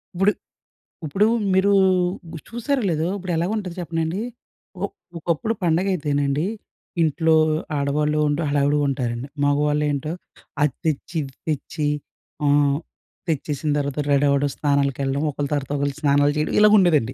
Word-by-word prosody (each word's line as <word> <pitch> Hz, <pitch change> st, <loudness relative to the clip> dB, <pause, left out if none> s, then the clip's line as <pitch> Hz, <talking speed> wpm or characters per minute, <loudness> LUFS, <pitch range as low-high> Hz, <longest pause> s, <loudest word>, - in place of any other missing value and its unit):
ఇప్పుడు, 195 Hz, +3 st, +4 dB, 0.7 s
ఇప్పుడు 195 Hz, +8 st, +2 dB, 0.3 s
మీరు 195 Hz, +2 st, +4 dB, 0.6 s
గు -, -, -5 dB
చూశారో 250 Hz, +4 st, -1 dB
లేదో 160 Hz, 0 st, 0 dB
ఇప్పుడెలాగుంటది 180 Hz, +1 st, -2 dB
చెప్పనాండి? 165 Hz, +3 st, -2 dB, 0.6 s
ఒ -, -, +3 dB, 0.3 s
ఒకప్పుడు 170 Hz, +7 st, -1 dB
పండగయితేనండి 155 Hz, -4 st, +1 dB, 0.6 s
ఇంట్లో 160 Hz, +1 st, +3 dB, 0.4 s
ఆడవాళ్ళుండు 150 Hz, +2 st, +1 dB
హడావిడిగా 145 Hz, +1 st, +2 dB
ఉంటారండి. 125 Hz, -1 st, -2 dB, 0.2 s
మగవాళ్ళేం‌టో 150 Hz, +1 st, +1 dB, 0.5 s
అది 145 Hz, -3 st, +3 dB
తెచ్చి 155 Hz, +2 st, -2 dB
ఇది 135 Hz, -1 st, -9 dB
తెచ్చి 150 Hz, 0 st, -2 dB, 0.6 s
ఆహ్, 145 Hz, 0 st, +3 dB, 0.5 s
తెచ్చేసిన 150 Hz, -1 st, -2 dB
తర్వాత 140 Hz, 0 st, -2 dB
రెడవ్వడం, 140 Hz, 0 st, +3 dB
స్నానాలకెళ్ళడం, 140 Hz, -1 st, 0 dB
ఒకలి 140 Hz, 0 st, -3 dB
తర్వాత 140 Hz, -2 st, -2 dB
ఒకలు 140 Hz, 0 st, -1 dB
స్నానాలు 145 Hz, -1 st, +4 dB
చేయడం, 150 Hz, -, -1 dB
ఇలగుండేదండి. 180 Hz, -, +5 dB
150 Hz, 110 wpm, -22 LUFS, 140-170 Hz, 0.7 s, ఇలగుండేదండి